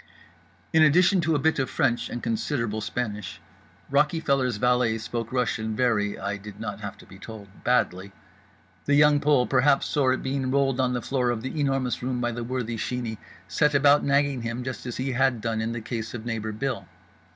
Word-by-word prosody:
In 160 - +5
addition 175 +5 +5
to 160 -1 +1
a - - +3
bit 160 +2 +1
of 135 - 0
French 125 -6 0
and 120 - -5
considerable 115 -1 -1
Spanish, 105 -3 -4 0.5
Rockyfeller's 140 -4 +2
valet 125 -1 +2
spoke 115 +1 -4
Russian 115 -3 -1
very 110 -4 +1
(I 100 +1 -3
did 105 0 -11
not 105 -1 -5
have 100 -2 -6
to - - -15
be 95 - -14
told) 100 -3 -11
badly. 100 -6 +1 0.7
The 145 - +3
Young 150 0 +5
Pole, 145 -4 +3
perhaps 135 +2 +3
sore 135 -3 +2
at - - -3
being 135 -1 -1
rolled 135 -1 +1
on 125 -1 +2
the 120 -2 -2
floor 125 -3 0
of 120 -2 -2
The 130 +4 -4
Enormous 135 -3 0
Room 125 0 -2
by 120 0 0
the 120 0 -4
worthy 120 -1 -3
Sheeney, 115 -1 -3 0.3
set 150 -2 +2
about 145 +1 +5
nagging 140 -2 +2
him 115 +2 -4
just 130 0 -6
as 120 - -4
he 130 +1 -2
had 130 -1 +2
done 110 0 -2
in 110 +1 -2
the 115 0 -4
case 115 0 -5
of 115 -1 -7
neighbour 110 -2 -3
Bill. 125 +3 -3
125 Hz, 195 wpm, -26 LUFS, 110-135 Hz, 0.7 s, In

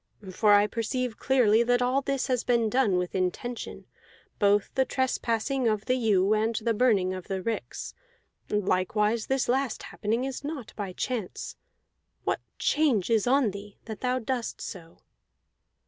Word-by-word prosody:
For 210 +3 +3
I 205 0 +6
perceive 230 +2 -2
clearly 235 -5 +4
that 245 +1 +3
all 250 +2 +2
this 275 -1 -1
has 250 -3 0
been 235 -3 +2
done 220 -7 +3
with 180 0 -2
intention, 190 +6 -3 0.5
both 205 0 +3
the 265 - +3
trespassing 260 -1 0
of 215 -1 0
the 255 - +2
ewe 210 -5 +3
and 220 +2 +1
the 230 +1 0
burning 210 -6 +2
of 185 -1 -7
the 195 -2 -2
ricks; 225 +4 -4 0.6
likewise 210 +3 +1
this 265 -1 +1
last 260 -1 0
happening 225 +4 -2
is 270 0 -4
not 285 -5 -6
by 200 -3 -4
chance. 225 -2 -4 0.7
What - - -1 0.2
change 260 - +2
is 225 0 +3
on 260 -4 +3
thee, 200 +1 -10
that 220 -2 -7
thou 255 0 +1
doest 250 -1 -3
so?" 165 -5 -8
230 Hz, 155 wpm, -27 LUFS, 205-255 Hz, 0.7 s, I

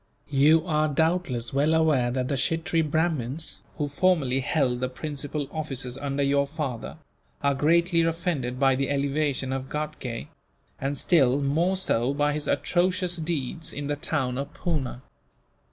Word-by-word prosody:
You 150 +4 +5
are 155 -3 +2
doubtless 155 -6 0
well 150 +4 +3
aware 150 -7 +3
that 125 +1 -1
the 145 - -1
Kshittree 165 +4 0
Brahmins, 155 -2 -1 0.2
who 145 - -1
formerly 145 -4 +2
held 130 -2 +1
the 130 0 -1
principal 145 +2 -4
offices 135 -5 -4
under 140 0 -2
your 140 0 +2
father, 140 -4 -5 0.5
are 140 0 +3
greatly 170 +4 +3
offended 165 -7 -1
by 135 -1 +4
the 135 +1 -1
elevation 140 -1 0
of 135 0 -4
Ghatgay; 150 -6 -4 0.5
and 140 +1 -2
still 135 -4 +3
more 165 +7 +1
so 135 -7 +1
by 145 0 +2
his 150 0 -3
atrocious 180 0 +1
deeds 160 0 -2
in 145 - -5
the 145 +1 -1
town 135 -4 0
of 140 - -4
Poona. 140 -7 -2
145 Hz, 150 wpm, -26 LUFS, 135-160 Hz, 0.5 s, You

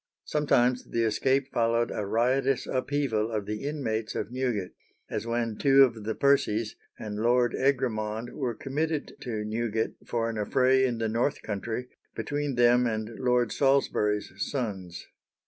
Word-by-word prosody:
Sometimes 125 -4 +1
the 115 - 0
escape 130 +5 +1
followed 115 0 +1
a 105 - -3
riotous 130 +4 +1
upheaval 130 -5 0
of 105 -3 -2
the 105 +3 -4
inmates 110 -7 -3
of - - -3
Newgate, 125 -7 -2 0.4
as 115 - -3
when 115 -2 -1
two 135 -1 +6
of 115 -5 0
the 110 - -2
Percies 115 -6 +2 0.2
and 105 -1 -6
Lord 120 +2 +3
Egremond 120 -4 0
were 125 -6 -3
committed 150 +5 -2
to 110 -4 -3
Newgate 110 0 -1
for 115 -1 -1
an 115 -1 -3
affray 130 +4 +3
in 120 -2 -2
the 115 0 -1
North 115 +6 0
Country 110 +4 -4 0.3
between 145 +4 -2
them 120 0 +4
and 110 -1 -2
Lord 125 -3 +2
Salisbury's 105 -8 +1
sons. 100 - -4
120 Hz, 145 wpm, -28 LUFS, 110-130 Hz, 0.4 s, two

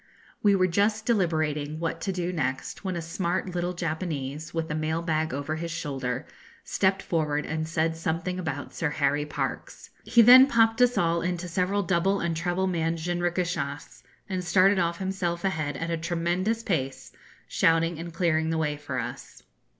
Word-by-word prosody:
We 205 -1 +5
were 185 -1 +3
just 205 +4 +1
deliberating 155 -8 0
what 165 0 -3
to 195 - -1
do 180 -1 -2
next, 150 -1 -3
when 190 -2 -2
a 170 - -3
smart 175 +2 -2
little 175 0 -1
Japanese, 160 -3 -4
with 165 -1 -3
a - - 0
mail 160 +2 -1
bag 160 -1 0
over 145 +4 -3
his 170 +1 -4
shoulder, 135 -7 -3 0.4
stepped 195 0 +1
forward 150 -3 0
and 155 0 -3
said 165 0 0
something 165 +3 -2
about 160 -5 -4
Sir 160 - -1
Harry 145 0 0
Parkes. - - -5
He 235 -1 +5
then 255 +3 +10
popped 225 -2 +3
us 245 0 +4
all 170 0 +2
into 180 0 -2
several 185 +3 0
double 190 +3 +1
and 170 -1 -1
treble 175 +3 0
manned 165 -2 0
jinrikishas, 175 -3 -2 0.3
and 185 -3 -3
started 185 +3 +4
off 170 -1 0
himself 185 -2 -2
ahead 155 -7 -1
at 165 +3 -3
a 165 - 0
tremendous 175 +7 -1
pace, 135 -11 -2 0.4
shouting 165 0 +2
and 170 +1 -6
clearing 160 -2 +1
the 165 - 0
way 150 -2 -1
for 150 - -5
us. - - -6
170 Hz, 175 wpm, -27 LUFS, 160-185 Hz, 0.4 s, then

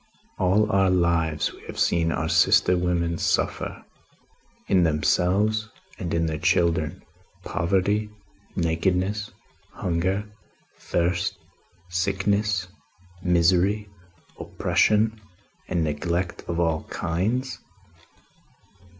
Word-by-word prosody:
All 105 +3 +3
our 95 -1 +3
lives, 85 -4 +1
we - - -15
have - - -8
seen 85 -1 +2
our 80 0 -1
sister 95 +2 +4
women 85 -1 0
suffer, - - -1 0.8
in 95 - +4
themselves 95 +7 +1 0.3
and 85 - -4
in 85 0 +1
their 80 -1 -2
children, 85 -4 +1 0.4
poverty, 100 +5 0 0.5
nakedness, 95 +5 0 0.4
hunger, 95 +4 -1 0.5
thirst, 85 0 -1 0.5
sickness, 100 +2 0 0.6
misery, 90 +4 +2 0.5
oppression 110 +1 +1 0.5
and 85 -2 0
neglect 85 +4 -2
of 85 0 -2
all 80 -2 0
kinds?" 110 +11 -2
90 Hz, 90 wpm, -25 LUFS, 85-100 Hz, 0.8 s, sister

